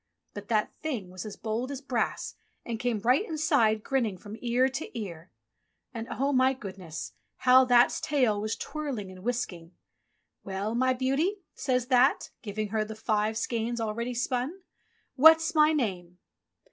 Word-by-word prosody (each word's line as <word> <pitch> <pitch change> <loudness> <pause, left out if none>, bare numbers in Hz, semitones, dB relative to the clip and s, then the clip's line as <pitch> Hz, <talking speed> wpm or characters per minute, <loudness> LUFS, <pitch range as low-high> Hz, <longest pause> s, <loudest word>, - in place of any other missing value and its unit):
But 205 0 -8
That 215 -2 +1
thing 240 - -5
was 185 +3 -7
as 205 - -7
bold 230 +4 -3
as 280 -2 -4
brass 255 -5 -2 0.3
and 230 -2 -4
came 245 -2 0
right 250 - +3
inside, 265 - +2
grinning 235 -8 0
from 205 +3 -9
ear 245 +2 +2
to 265 -2 -5
ear. 170 -4 -7 0.6
And 230 -1 -5
oh, 275 +2 0
my 260 0 +4
goodness! 185 -8 -7 0.2
how 255 +1 +6
That's 245 -1 +4
tail 250 -8 +1
was 215 +1 -2
twirling 270 -11 -5
and 185 0 -12
whisking! 190 -8 -3 0.7
''Well, 200 +3 -3
my 255 +1 +3
beauty," 285 +10 0
says 255 -3 0
That, 255 +2 +3
giving 210 -1 -4
her 215 +1 0
the 215 +1 -7
five 215 0 0
skeins 235 +1 -2
all 220 -2 -1
ready 235 +2 -3
spun, 255 +9 -2 0.5
"what's 320 +4 +7
my 305 -1 +5
name?" 185 - -2
235 Hz, 160 wpm, -28 LUFS, 210-260 Hz, 0.7 s, what's